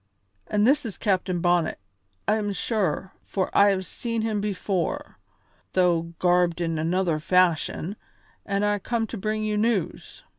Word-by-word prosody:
"And 210 0 +2
this 275 +4 +4
is 225 -5 -6
Captain 185 -4 0
Bonnet, 175 -2 +2 0.5
I 215 - +3
am 205 -2 -1
sure, 195 -1 -1
for 190 -2 -2
I 200 0 +7
have 190 -1 0
seen 230 +4 -3
him 215 -2 0
before, 205 - -2 0.5
though 170 -2 +2
garbed 175 -1 +2
in 165 -2 -1
another 170 0 +1
fashion, 180 +2 +1 0.5
and 200 +1 0
I 205 0 +1
come 230 +3 -1
to 225 - -7
bring 215 +2 -1
you 210 -1 0
news. 215 -4 -1
195 Hz, 150 wpm, -25 LUFS, 175-215 Hz, 0.5 s, I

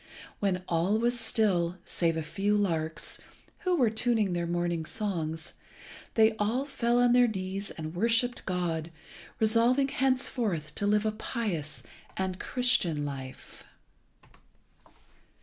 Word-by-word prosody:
When 185 -3 0
all 175 +5 +2
was 240 +1 +1
still, 185 -7 +1
save 165 -2 +1
a 160 - -2
few 200 +7 0
larks, 165 -5 -1 0.4
who 365 -3 +1
were 245 -9 +3
tuning 220 -4 +1
their 170 -1 -1
morning 175 -1 -1
songs, 165 -5 -3 0.6
they 220 0 +6
all 230 +6 0
fell 240 -4 +1
on 245 0 +4
their 245 0 +6
knees 195 -1 -4
and 155 0 -6
worshipped 230 +5 +1
God, 170 -3 -1 0.5
resolving 235 +5 +3
henceforth 255 - 0
to 205 - 0
live 210 +1 +2
a 215 - +2
pious 205 - -4 0.3
and 190 -1 -1
a 185 - -14
Christian 185 - +1
life. 135 -2 -8
200 Hz, 130 wpm, -29 LUFS, 170-235 Hz, 0.6 s, they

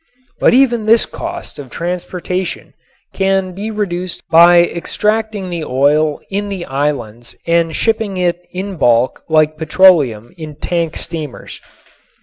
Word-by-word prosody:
But - - +4
even 240 -5 +3
this 230 +1 +5
cost - - -7
of 135 -3 -9
transportation 180 +3 -4 0.4
can 195 -1 0
be 205 +4 -5
reduced 185 -4 -3
by 170 +1 +7
extracting 210 +2 -2
the 170 -2 -3
oil 145 +3 +1
in 205 +1 -2
the 190 -3 -5
islands 135 -5 -3
and 170 -1 +1
shipping 220 -4 -1
it 175 -1 0
in 190 +1 -5
bulk 120 -2 +2
like 155 -1 +2
petroleum 155 - +3
in 155 -2 -7
tank 170 +1 -2
steamers. 155 -5 -7
175 Hz, 130 wpm, -16 LUFS, 155-195 Hz, 0.4 s, by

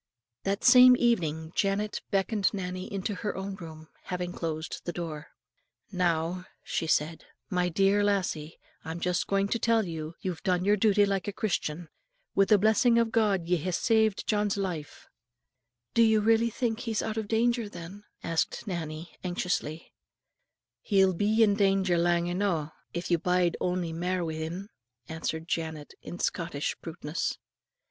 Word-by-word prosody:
That 195 +2 -1
same 250 0 +8
evening 160 -10 0
Janet 205 +1 0
beckoned 200 0 +1
Nannie 185 -1 -5
into 200 +1 -2
her 205 +1 -3
own 195 +1 -4
room, 160 -3 -9
and 155 - -21
having 180 -1 -3
closed 160 -1 -4
the 175 - -3
door, 160 -4 -6 0.6
"Now," 180 -1 0 0.2
she 165 - -2
said, 160 +1 0 0.3
"my 180 -1 +1
dear 195 +4 +3
lassie, 180 -6 -1 0.3
I'm 165 +1 -5
just 180 0 0
going 195 0 +1
to 235 - 0
tell 225 -1 +2
you, 160 -1 -6
you've 180 -3 -4
done 180 -1 +1
your 205 +1 +5
duty 205 0 +4
like 195 -1 -1
a - - -1
Christian. 175 -5 -2 0.5
Wi' 195 - +4
the 210 +2 +5
blessing 220 +3 +4
of 230 -1 +2
God 205 -7 +2
ye 180 0 +2
hae 170 +4 -3
saved 220 +2 +2
John's 210 -2 +1
life." 175 -7 -5 0.9
"You 220 -2 +5 0.3
think 230 -1 -2
he 230 - -4
is 210 - 0
really - - -3
out 215 - -6
of 220 -2 -2
danger, 230 0 +1
then?" 190 +2 -9 0.2
asked 165 +6 -1
Nannie, 165 -3 -5
anxiously. 175 -3 -3 0.9
"He'll 190 -2 +3
be 215 +5 +3
in 205 -2 +4
danger 195 -3 +2
lang 170 0 +2
eno', 175 -4 -1 0.2
if 175 +1 -4
you 170 - +3
bide 180 0 +2
ony 180 -2 -1
mair 180 +1 -1
wi' 160 - -3
him," 165 +6 -5 0.4
answered 160 0 -4
Janet, 160 -3 -3
with 175 - -6
Scottish 165 -4 -2
bluntness. 160 -1 -3
185 Hz, 160 wpm, -28 LUFS, 165-205 Hz, 0.9 s, same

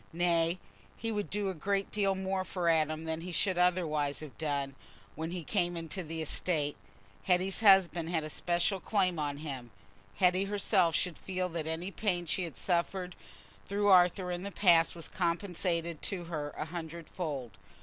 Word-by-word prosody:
Nay, 170 0 +2 0.4
he 225 - -3
would 205 -2 -2
do 205 -1 0
a - - -2
great 195 +4 -1
deal 195 -2 +2
more 190 0 -1
for 180 -2 -1
Adam 155 -1 +2
than 160 0 -3
he 180 +2 -6
should 180 +1 +1
otherwise 155 -6 +1
have 155 -3 -9
done, 140 -3 -1 0.4
when 160 +1 -4
he 175 -1 -4
came 175 -2 0
into 165 +3 -4
the 160 -1 -4
estate; 150 -2 0 0.5
Hetty's 185 +1 +2
husband 185 -6 +5
had 165 -3 0
a 155 - -5
special 175 +4 0
claim 185 -3 +1
on 145 -1 -2
him—Hetty 125 - -2
herself 195 -5 +2
should 180 -3 -1
feel 185 -1 -2
that 165 -2 -3
any 165 +4 -3
pain 180 -4 -1
she 175 +3 0
had 165 - -8
suffered 180 0 -1 0.5
through 205 +1 +1
Arthur 180 0 +5
in 175 0 -3
the 200 +1 -5
past 175 -5 +4
was 165 - -4
compensated 170 -2 -1
to 185 -3 -3
her 155 -3 -4
a - - -2
hundredfold. 160 -5 -5
175 Hz, 170 wpm, -31 LUFS, 160-185 Hz, 0.5 s, husband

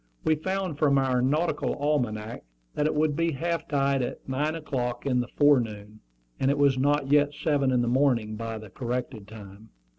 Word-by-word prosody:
We 160 - +3
found 185 0 -3
from 140 -3 +3
our 130 -2 +1
nautical 150 +7 0
almanac 120 -7 -2 0.3
that 150 - 0
it 155 - -1
would 150 -1 +1
be 165 +1 0
half 165 +3 -2
tide 140 -2 +1
at 120 - -5
nine 145 +4 -1
o'clock 125 -6 -3
in 125 -3 +1
the 120 - -2
forenoon; 110 -8 +1 0.4
and 135 - +2
it 140 - +1
was 140 -2 +4
not 140 +1 +1
yet 145 0 +3
seven 145 -3 +1
in 125 -1 +2
the - - -1
morning 120 -4 +1
by 115 0 -5
the 110 -3 -11
corrected 120 -3 -4
time. 105 0 -12
135 Hz, 185 wpm, -26 LUFS, 120-150 Hz, 0.4 s, was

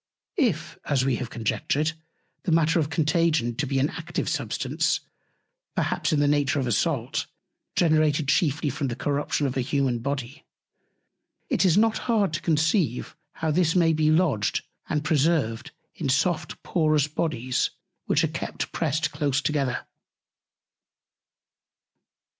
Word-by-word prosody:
If, 195 - 0
as 135 -3 +1
we 130 -3 +1
have 125 -3 -5
conjectured, 140 +7 -1 0.5
the 185 - -2
Matter 165 +1 +3
of 150 -2 0
Contagion 155 -4 +2
be 135 +3 -2
an 135 +3 +2
active - - -4
Substance, - - -1 0.7
perhaps - - 0
in 155 - +2
the 145 - +3
Nature 145 0 +2
of 135 - 0
a 120 - -1
Salt, 100 - 0 0.5
generated 155 -3 +3
chiefly 145 -1 +2
from 140 +2 -2
the 120 - -3
Corruption 145 +2 -1
of 130 -2 -1
a 130 - +1
Humane 130 -2 0
Body, 140 +3 -4 1.1
it - - +3
is 180 0 +4
not 220 +1 +3
hard 205 -7 +2
to 155 - -2
conceive 160 - +1 0.2
how 160 -1 -1
this 165 +1 +2
may 165 -2 +4
be 155 0 +2
lodged 155 - +2 0.3
and 150 -1 0
preserved 150 -7 +1 0.2
in 150 -5 -3
soft, 160 +6 0
porous 155 -4 +2
Bodies, 130 -5 -1 0.4
which - - +3
are - - +3
kept - - -4
pressed 150 +3 0
close 140 -2 0
together. 145 -4 -1
150 Hz, 140 wpm, -25 LUFS, 135-160 Hz, 1.1 s, is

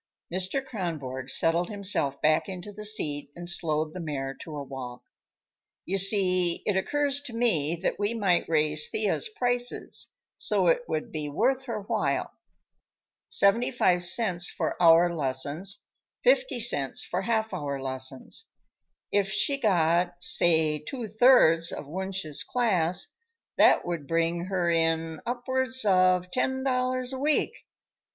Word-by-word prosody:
Mr. 190 +9 -2
Kronborg 150 - -5
settled 170 +4 +2
himself 195 -9 0
back 155 +5 +2
into 185 +2 -7
the 210 +1 -7
seat 150 -10 -1
and 175 0 -8
slowed 155 -2 -1
the 185 - -7
mare 140 -5 -4
to 155 +2 -10
a 145 - -5
walk. 130 -2 -8 0.8
"You 195 +2 -1
see, 185 -3 +3
it 205 - 0
occurs 285 +7 0
to 275 -5 -8
me 170 -10 +1
that - - -1
we 205 +3 -1
might 190 -7 +1
raise 155 -1 +3
Thea's 215 - -1
prices, 245 - -1 0.3
so - - +1
it - - +1
would 240 - -3
be 150 -4 -4
worth 260 - 0
her 230 -4 -4
while. - - -1 1.0
Seventy 225 +5 +3
five 180 -8 +1
cents 175 -2 +1
for - - -3
hour 170 +1 +6
lessons, 145 +6 -2 0.4
fifty - - +2
cents 145 - +1
for 180 - -3
half 220 +1 -1
hour 140 -2 -4
lessons. 130 0 -2 0.6
If 200 -1 +1
she 280 +6 +1
got, 175 -4 +2
say 160 -3 +3
two 230 - -6
thirds 205 -8 +5
of 145 - -7
Wunsch's 190 -2 -2
class, 185 -7 +1 0.5
that - - +5
would 170 -5 -4
bring 165 +1 0
her 185 -2 -1
in 165 -1 0
upwards 260 0 -1
of 185 -2 +3
ten 265 +3 -1
dollars 255 -1 -1
a 260 - -5
week. 300 +2 +1
180 Hz, 140 wpm, -27 LUFS, 160-230 Hz, 1.0 s, hour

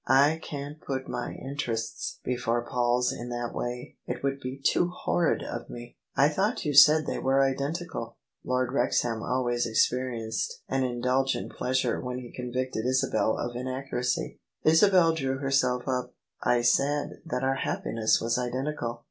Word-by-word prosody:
"I 140 +5 +5
can't 145 +1 -7
put 130 -1 -4
my 120 - -3
interests 140 - -4
before 120 -1 -1
Paul's 125 +1 +1
in 120 -2 -6
that 120 -1 -3
way: 125 0 -5
it - - -4
would 135 0 0
be 130 +1 -6
too 175 +5 +2
horrid 175 -1 0
of 120 - -6
me! 120 0 -9
" - - -61
" - - -45
I 140 - +6
thought 190 +8 0
you 150 - 0
said 150 +2 +8
they - - -2
were 135 +1 +3
identical." 140 -2 -2 0.3
Lord 125 0 0
Wrex 140 - +2
ham 115 -2 -2
always 120 -1 0
experienced 115 0 0
an 135 0 0
indulgent 125 +2 0
pleasure 130 +1 0
when 125 -1 -4
he 125 -2 -8
convicted 125 -2 -3
Isabel 130 -3 +1
of 120 0 -3
inaccuracy. 130 0 -2 0.2
Isabel 165 +1 +5
drew 135 -4 -1
herself 130 -2 +1
up: 125 -1 -2 0.3
"I 120 -1 +2
said 145 +4 +1
that 125 +1 -2
our 135 0 +1
happiness 110 -3 +1
was 115 +2 0
identical. 125 -1 -2
130 Hz, 160 wpm, -28 LUFS, 120-140 Hz, 0.3 s, said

